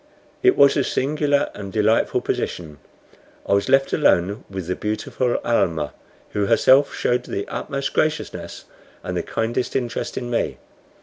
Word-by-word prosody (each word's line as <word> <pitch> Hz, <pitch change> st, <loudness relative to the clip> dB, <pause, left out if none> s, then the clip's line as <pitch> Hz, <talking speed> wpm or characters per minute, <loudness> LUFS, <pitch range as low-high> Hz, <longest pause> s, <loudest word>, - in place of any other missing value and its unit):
It 380 Hz, -1 st, +4 dB
was 140 Hz, -1 st, +6 dB
a 140 Hz, -, +2 dB
singular 145 Hz, +1 st, 0 dB
and 100 Hz, -2 st, -7 dB
a -, -, -11 dB
delightful 110 Hz, +2 st, +2 dB
position. 75 Hz, -4 st, -4 dB, 0.7 s
I -, -, +1 dB
was 100 Hz, 0 st, +1 dB
left 135 Hz, 0 st, +3 dB
alone 100 Hz, -, +2 dB
with 95 Hz, -3 st, -5 dB
the 90 Hz, +2 st, -2 dB
beautiful 110 Hz, +3 st, -2 dB
Almah, 80 Hz, -10 st, 0 dB, 0.4 s
who 100 Hz, -1 st, 0 dB
herself 130 Hz, +5 st, +4 dB
showed 125 Hz, 0 st, +1 dB
the 100 Hz, -, -4 dB
utmost 140 Hz, 0 st, -4 dB
graciousness 155 Hz, 0 st, -2 dB, 0.4 s
and -, -, -4 dB
the -, -, 0 dB
kindest 115 Hz, +2 st, -2 dB
interest 120 Hz, -3 st, -2 dB
in 120 Hz, -1 st, -4 dB
me. 120 Hz, -, -1 dB
120 Hz, 150 wpm, -22 LUFS, 100-135 Hz, 0.7 s, was